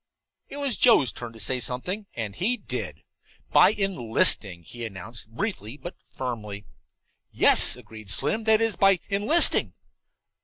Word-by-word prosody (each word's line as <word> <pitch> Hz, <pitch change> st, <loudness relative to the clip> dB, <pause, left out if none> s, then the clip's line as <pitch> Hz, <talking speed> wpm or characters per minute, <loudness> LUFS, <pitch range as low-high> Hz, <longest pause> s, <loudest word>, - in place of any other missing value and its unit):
It 280 Hz, -, -8 dB
was 280 Hz, -4 st, -1 dB
Joe's 145 Hz, -, +4 dB
turn 120 Hz, -1 st, -8 dB
to 115 Hz, -, -14 dB
say 125 Hz, +6 st, -1 dB
something, 180 Hz, -, -4 dB
and 110 Hz, -4 st, -5 dB
he 240 Hz, +7 st, 0 dB
did. 210 Hz, -, -7 dB, 0.5 s
"By -, -, +6 dB
enlisting," 115 Hz, -, +1 dB
he 120 Hz, +8 st, -9 dB
announced, 110 Hz, +1 st, -7 dB
briefly 125 Hz, -, -5 dB
but 175 Hz, +4 st, -9 dB, 0.2 s
firmly. 105 Hz, -5 st, -6 dB, 0.6 s
"Yes," -, -, +5 dB
agreed 110 Hz, -3 st, -13 dB
Slim, 215 Hz, -, 0 dB
"that's 220 Hz, 0 st, +3 dB
it, 225 Hz, -2 st, -1 dB
by 195 Hz, -1 st, +4 dB
enlisting." 210 Hz, +12 st, +2 dB
125 Hz, 140 wpm, -25 LUFS, -, 0.6 s, By